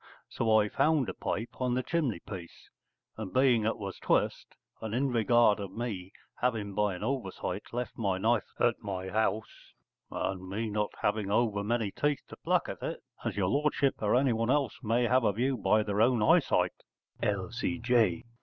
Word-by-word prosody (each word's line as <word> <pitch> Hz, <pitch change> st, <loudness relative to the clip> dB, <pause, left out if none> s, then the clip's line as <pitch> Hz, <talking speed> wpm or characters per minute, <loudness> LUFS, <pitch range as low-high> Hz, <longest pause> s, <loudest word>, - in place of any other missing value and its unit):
So 110 Hz, -1 st, +2 dB
I 105 Hz, -, +2 dB
found 150 Hz, +3 st, +2 dB
a -, -, -3 dB
pipe 115 Hz, +3 st, -4 dB
on 125 Hz, -1 st, +1 dB
the 130 Hz, -, 0 dB
chimney 140 Hz, -, -1 dB
piece, 90 Hz, -5 st, -10 dB, 0.5 s
and 105 Hz, -4 st, -5 dB
being 125 Hz, -2 st, +3 dB
it 115 Hz, -, 0 dB
was 100 Hz, -3 st, -6 dB
twist, -, -, 0 dB, 0.3 s
and 110 Hz, 0 st, -3 dB
in 135 Hz, +2 st, +1 dB
regard 115 Hz, -2 st, +4 dB
of 100 Hz, -2 st, -6 dB
me 100 Hz, -5 st, -4 dB, 0.3 s
having 110 Hz, -5 st, -1 dB
by 105 Hz, -1 st, +1 dB
an 90 Hz, -, -7 dB
oversight 120 Hz, -6 st, -3 dB
left 120 Hz, 0 st, -4 dB
my 100 Hz, -4 st, +1 dB
knife 110 Hz, 0 st, +1 dB
at 120 Hz, -2 st, +2 dB
my 95 Hz, -2 st, -4 dB
house, 110 Hz, 0 st, -2 dB, 0.4 s
and 95 Hz, -1 st, -3 dB
me 110 Hz, +3 st, -2 dB
not 105 Hz, 0 st, 0 dB
having 105 Hz, -1 st, 0 dB
over 105 Hz, -1 st, +1 dB
many 110 Hz, -1 st, 0 dB
teeth 145 Hz, +4 st, -1 dB
to -, -, -10 dB
pluck -, -, +1 dB
at -, -, -6 dB
it, -, -, -4 dB, 0.2 s
as -, -, -3 dB
your 95 Hz, -2 st, +1 dB
lordship 140 Hz, 0 st, +1 dB
or 105 Hz, +2 st, +2 dB
anyone 120 Hz, -3 st, +2 dB
else 135 Hz, -4 st, +2 dB
may 120 Hz, +1 st, +1 dB
have 125 Hz, +2 st, +3 dB
a 105 Hz, -, +3 dB
view 130 Hz, +6 st, 0 dB
by 110 Hz, -1 st, +2 dB
their 105 Hz, 0 st, 0 dB
own 120 Hz, -1 st, +4 dB
eyesight -, -, +3 dB, 0.5 s
_L.C.J. 115 Hz, 0 st, +1 dB
110 Hz, 180 wpm, -30 LUFS, 100-125 Hz, 0.5 s, regard